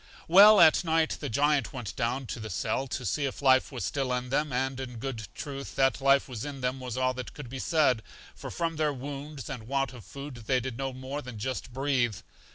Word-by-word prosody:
Well, 205 +5 +9
at 155 - +7
night 160 -1 +1
the 145 - -4
Giant 145 +2 +2
went 120 -7 -6
down 130 +3 -1
to 120 - -5
the 110 0 -6
cell 130 +8 -1
to 130 -1 -4
see 145 - 0
if 130 - -6
life 130 -1 +4
was 125 -3 -4
still 135 -3 -1
in 125 0 -2
them, 150 +2 0
and 130 +1 -1
in 125 -2 -6
good 115 -4 -5
truth 140 -2 -6
that 135 -1 +2
life 135 0 +4
was 120 -5 -6
in 140 -2 -6
them 125 +1 -1
was 125 -1 -5
all 130 0 +2
that 125 -1 -7
could 140 -5 -8
be 135 - -5
said, 140 -6 +2 0.3
for - - -8
from 165 -2 -2
their 155 -1 +1
wounds 140 +1 -7
and 120 -5 -6
want 135 -1 0
of 120 -4 -11
food 130 +3 -9
they 130 -1 +3
did 125 0 -5
no 135 +2 -3
more 130 +3 -5
than 125 -4 -8
just 130 +3 -4
breathe. 130 -4 +1
135 Hz, 230 wpm, -29 LUFS, 125-140 Hz, 0.3 s, Well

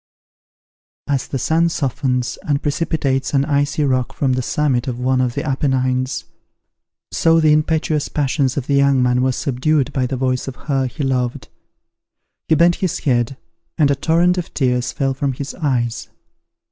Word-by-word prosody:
As 140 -3 -1
the 135 - -3
sun 165 +6 +2
softens 130 -4 -1
and 145 -1 -1
precipitates 145 -3 -1
an 135 0 +3
icy 145 +1 0
rock 130 -3 0
from 135 -2 0
the 130 - 0
summit 130 -1 0
of 125 -2 -3
one 130 +1 +1
of 125 -2 -1
the - - -2
Appenines, 130 -1 0 0.9
so 165 0 +3
the 155 -1 +4
impetuous 155 -1 +1
passions 140 -2 0
of 135 - -1
the 140 - -1
young 140 -2 +4
man 125 0 +2
were 130 0 +2
subdued 135 +2 0
by 130 -2 0
the 130 - -3
voice 130 0 -1
of 135 - -5
her 135 -3 -1
he 145 +4 -5
loved. 125 -2 -1 1.0
He 160 - +4
bent 170 +2 +4
his 185 -4 -1
head, 125 -1 0 0.4
and 145 -4 +3
a - - +2
torrent 175 +4 +2
of 175 - -6
tears 125 -3 0
fell 135 -1 -1
from 135 0 -1
his 140 +3 -6
eyes. 125 -8 -2
135 Hz, 170 wpm, -19 LUFS, 130-150 Hz, 1.0 s, the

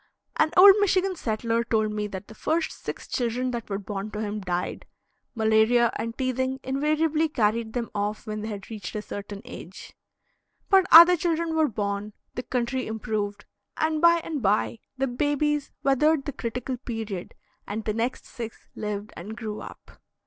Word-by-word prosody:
An 315 - +3
old 390 +2 +11
Michigan 385 -1 +2
settler 230 -4 -1
told 220 -2 +1
me 210 0 -2
that 195 0 -7
the - - -11
first 320 +8 -1
six - - -6
children 250 +1 -1
that 235 -3 -5
were 195 - -1
born 200 0 -5
to 210 0 -6
him 210 0 -3
died; 180 -1 -3 0.5
malaria 220 +2 +4
and 230 0 -4
teething 260 0 -1
invariably 305 +4 +1
carried 220 -2 0
them 235 -3 -3
off 210 +1 -2
when 215 -1 -4
they 215 - -4
had 205 -1 -7
reached 210 -4 -6
a 210 - -3
certain 205 +1 -7
age; 190 -7 -10 0.8
but 385 -1 +6
other 340 +2 +11
children 335 -1 -1
were 315 -1 +4
born, 205 -2 -3 0.2
the - - -3
country 250 +1 -2
improved, 210 -2 -3 0.3
and 315 -1 0
by 340 0 +6
and 305 -4 -3
by 115 - +1 0.2
the 270 - +1
babies 290 +3 0
weathered 280 +2 +3
the 285 - -4
critical 250 0 -4
period 225 -7 -5 0.3
and 215 +2 -4
the 215 - 0
next 230 +3 -2
six 230 -2 -8
lived 210 0 -5
and 210 +6 -8
grew 215 -2 -5
up. - - -12
230 Hz, 170 wpm, -26 LUFS, 210-290 Hz, 0.8 s, old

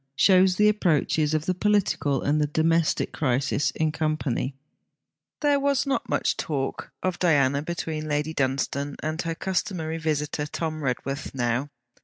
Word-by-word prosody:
SHOWS 185 +1 +5
THE 210 +2 +4
APPROACHES 160 -6 +2
OF 155 0 -1
THE 185 - +1
POLITICAL 185 -8 +1
AND 150 +2 +2
THE 150 - +2
DOMESTIC 160 +2 +1
CRISIS 135 0 0
IN 155 -1 +1
COMPANY 150 -4 -1 0.9
There 290 -1 +3
was 280 -1 +1
not 275 -1 -1
much - - +1
talk 135 -4 -3
of 185 -1 -1
Diana 140 -5 +3
between 155 -1 -4
Lady 150 +2 -1
Dunstane 140 +1 -1
and 155 +2 -2
her 165 -1 -3
customary 175 -3 -2
visitor 150 -1 -1
Tom 155 0 -3
Redworth 135 +2 -3
now. 120 +2 0
155 Hz, 145 wpm, -25 LUFS, 145-175 Hz, 0.9 s, SHOWS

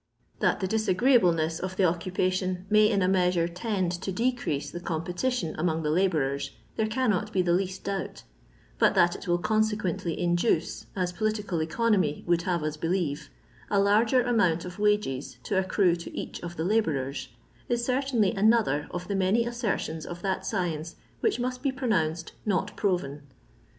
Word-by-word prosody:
That - - +1
the 190 - 0
disagreeable 220 0 +3
ness 160 0 -1
of 185 0 -4
the 195 - +1
occupation 185 +1 -1
may 215 0 +6
in 200 -4 +2
a - - +3
measure 180 -2 +2
tend 185 0 -2
to 190 - -3
decrease 225 - -1
the 175 - -5
competition 175 +4 -2
among 160 -1 0
the 150 - 0
labourers, 145 -6 +1 0.3
there 220 - 0
cannot 220 -4 0
be 185 - +2
the 175 -1 +2
least 185 +1 -1
doubt, 195 -1 -4 0.6
but - - +4
that 175 +2 +4
it - - -9
will 175 0 +3
consequently 210 -4 0
induce, 175 0 0
as 180 -2 -1
political 210 -3 -1
economy 180 -2 +1
would 175 -1 +2
have 170 -3 0
us 155 0 -2
believe, 165 - -1 0.4
a 200 - +2
larger 220 +5 +4
amount 185 -9 +2
of 180 +1 -8
wages 210 -11 0
to 195 -3 +1
accrue 190 -2 +2
to 170 - -8
each - - -5
of 175 0 -6
the 160 - -1
labourers, 140 -10 0 0.4
is 240 0 0
certainly 250 -6 +1
another 205 -8 +2
of 175 +1 -5
the 205 - -2
many 195 +4 +2
assertion% 220 -9 -2
of 175 0 -7
that 190 -1 -1
science 170 -5 -2 0.2
which 430 - +1
must 250 +1 -2
be 275 -1 +1
pronounced 175 - -1
" - - -32
not 205 0 -1
proven." 175 -8 -1
185 Hz, 170 wpm, -27 LUFS, 170-215 Hz, 0.6 s, may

